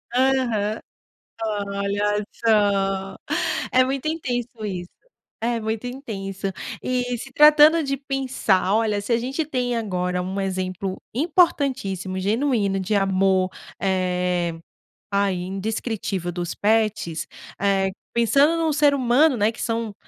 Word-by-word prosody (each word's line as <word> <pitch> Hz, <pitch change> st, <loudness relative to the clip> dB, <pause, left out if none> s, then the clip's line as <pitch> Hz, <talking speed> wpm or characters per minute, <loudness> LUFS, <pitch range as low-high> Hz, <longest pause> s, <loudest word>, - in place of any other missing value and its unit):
Aham. 245 Hz, -5 st, +1 dB, 0.7 s
Olha 205 Hz, 0 st, -1 dB
só! 195 Hz, -3 st, +1 dB, 0.6 s
É 255 Hz, 0 st, +5 dB
muito 270 Hz, +3 st, -2 dB
intenso 250 Hz, -7 st, -2 dB, 0.2 s
isso. 180 Hz, -3 st, -5 dB, 0.5 s
É 235 Hz, 0 st, 0 dB
muito 220 Hz, +2 st, -3 dB
intenso. 195 Hz, -7 st, -5 dB, 0.3 s
E 250 Hz, -1 st, -1 dB
se 270 Hz, +3 st, -9 dB
tratando 305 Hz, +2 st, +7 dB
de 275 Hz, 0 st, -1 dB
pensar 260 Hz, -8 st, 0 dB
olha, 215 Hz, -2 st, +1 dB
se 205 Hz, -, -5 dB
a -, -, +4 dB
gente 265 Hz, +6 st, -2 dB
tem 250 Hz, -4 st, -1 dB
agora 180 Hz, -5 st, -1 dB
um 190 Hz, +2 st, -3 dB
exemplo 185 Hz, 0 st, -3 dB
importantíssimo, 260 Hz, -, +1 dB
genuíno 210 Hz, -1 st, +1 dB
de 195 Hz, +3 st, -1 dB
amor, 190 Hz, -1 st, +2 dB, 0.3 s
eh, 180 Hz, -2 st, 0 dB, 0.6 s
ah, 200 Hz, 0 st, +2 dB
indescritível 195 Hz, 0 st, -3 dB
dos 175 Hz, -1 st, -4 dB
pets, 210 Hz, -7 st, 0 dB, 0.3 s
eh, 195 Hz, -1 st, +2 dB, 0.2 s
pensando 275 Hz, +7 st, +4 dB
num 325 Hz, -1 st, +1 dB
ser 290 Hz, 0 st, +4 dB
humano, 260 Hz, +3 st, +4 dB
né, 210 Hz, +2 st, +2 dB
que 225 Hz, -, -10 dB
são 230 Hz, -2 st, -2 dB
215 Hz, 120 wpm, -23 LUFS, 195-255 Hz, 0.7 s, tratando